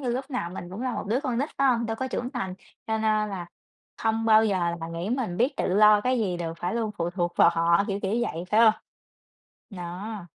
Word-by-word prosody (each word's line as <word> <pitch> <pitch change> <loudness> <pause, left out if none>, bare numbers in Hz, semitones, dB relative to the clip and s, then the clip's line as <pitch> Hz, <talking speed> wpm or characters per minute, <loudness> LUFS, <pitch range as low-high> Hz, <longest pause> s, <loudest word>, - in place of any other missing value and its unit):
như 255 - -3
lúc 260 +4 -3
nào 245 -10 -3
mình 175 -1 -8
cũng 210 +7 -6
là 255 - -1
một - - -4
đứa 235 +6 +1
con 255 -5 -2
nít, 285 +4 0
phải 275 - +4
hông? 235 -2 +2
Đâu 225 0 -3
có 260 +1 -3
trưởng 250 0 -3
thành, 190 -1 -4 0.3
cho 220 0 0
nên - - -3 0.3
là 185 -4 -5 0.6
hông 225 0 +1
bao 220 0 +6
giờ 200 -3 +1 0.2
mà 165 - -5
nghĩ 170 +5 -4
mình 240 -9 -2
biết 265 +4 +1
tự - - -1
lo 210 0 +6
cái 250 +3 +1
gì 185 -5 0
được 165 -1 -4
phải 180 +5 -2
luôn 225 -2 -1
phụ 170 +1 -1
thuộc 175 -1 -2
vào - - +6
họ, 170 +3 +3
kiểu, 200 0 -1
kiểu, 195 0 -1
vậy, 170 -6 -3
phải 215 +2 +4
hông? 220 -2 +7 1.0
Đó. 185 +2 -6
215 Hz, 250 wpm, -26 LUFS, 175-235 Hz, 1.0 s, hông